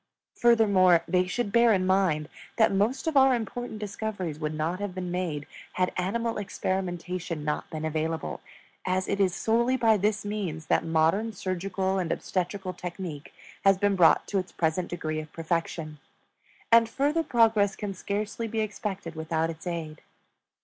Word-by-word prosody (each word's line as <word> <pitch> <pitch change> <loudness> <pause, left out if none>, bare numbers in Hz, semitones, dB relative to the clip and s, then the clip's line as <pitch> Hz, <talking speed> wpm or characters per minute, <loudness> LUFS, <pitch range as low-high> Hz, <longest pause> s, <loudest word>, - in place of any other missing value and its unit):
Furthermore, 200 -7 +5
they 180 +1 +2
should 205 +2 -2
bear 235 +1 +5
in 185 -2 +1
mind 185 -6 +2 0.3
that 220 -3 +4
most 220 - +1
of 320 -2 -1
our 265 -1 +6
important 235 0 -4
discoveries 205 -6 -4
would 155 -1 -2
not 165 +4 -1
have 205 -3 -4
been 180 -1 -4
made 170 -5 -2 0.3
had 185 0 0
animal 225 +5 -1
experimentation 180 -4 -3
not 150 - -2
been 155 0 -4
available, 160 0 -2 0.4
as 185 0 0
it 200 - -1
is 185 -3 +2
solely 235 +3 +2
by 225 -3 +4
this 205 +1 0
means 190 -7 -3
that - - +2
modern 165 +7 +1
surgical 190 0 -2
and 175 -3 -2
obstetrical 185 +1 -2
technique 175 -4 -7 0.3
has 195 -1 +5
been 205 0 +2
brought 175 -3 +5
to 200 - 0
its 185 - -6
present 170 +2 0
degree 155 -3 -3
of 155 0 -8
perfection; 165 -2 -3 0.7
and 230 0 +6
further 290 +7 +1
progress 225 -8 +3
can 205 -2 -4
scarcely 205 +4 -3
be 225 0 -3
expected 200 -5 -4
without 160 0 -1
its 160 +2 -10
aid. 160 -3 -4
185 Hz, 160 wpm, -27 LUFS, 165-210 Hz, 0.7 s, our